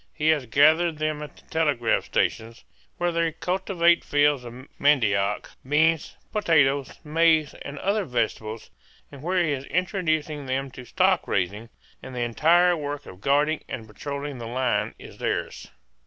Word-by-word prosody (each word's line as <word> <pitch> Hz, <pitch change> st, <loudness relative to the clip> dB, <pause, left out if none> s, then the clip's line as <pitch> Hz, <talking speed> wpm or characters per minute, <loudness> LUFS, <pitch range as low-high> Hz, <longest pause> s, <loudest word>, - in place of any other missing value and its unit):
He 155 Hz, 0 st, +1 dB
has 150 Hz, -5 st, +2 dB
gathered 155 Hz, +6 st, +4 dB
them 155 Hz, -1 st, -2 dB
at 150 Hz, -1 st, -9 dB
the -, -, -19 dB
telegraph 145 Hz, -8 st, +1 dB
stations, 115 Hz, +1 st, -1 dB, 0.3 s
where 175 Hz, 0 st, 0 dB
they 165 Hz, -1 st, 0 dB
cultivate 180 Hz, -1 st, +1 dB
fields 145 Hz, -2 st, +2 dB
of 125 Hz, +3 st, -10 dB
mandioc, 105 Hz, -8 st, +2 dB
beans, 155 Hz, +3 st, +1 dB
potatoes, 145 Hz, -9 st, +2 dB
maize, 160 Hz, -1 st, +3 dB
and 140 Hz, 0 st, -7 dB
other 200 Hz, +6 st, 0 dB
vegetables, 115 Hz, -4 st, -3 dB, 0.4 s
and 140 Hz, -2 st, -11 dB
where 180 Hz, +3 st, +1 dB
he 155 Hz, -, 0 dB
is 135 Hz, -1 st, -3 dB
introducing 155 Hz, -6 st, -1 dB
them 135 Hz, +1 st, -2 dB
to 125 Hz, 0 st, -10 dB
stock -, -, +2 dB
raising; 100 Hz, +5 st, -2 dB, 0.3 s
and 130 Hz, -, -9 dB
the 125 Hz, -, -2 dB
entire 170 Hz, +9 st, +4 dB
work 145 Hz, -2 st, -5 dB
of 90 Hz, +1 st, -12 dB
guarding 145 Hz, +5 st, +2 dB
and 115 Hz, -, -5 dB
patrolling 140 Hz, +4 st, -6 dB
the 115 Hz, -, -6 dB
line 125 Hz, +1 st, -1 dB
is -, -, -13 dB
theirs. -, -, -3 dB
145 Hz, 155 wpm, -25 LUFS, 125-160 Hz, 0.4 s, gathered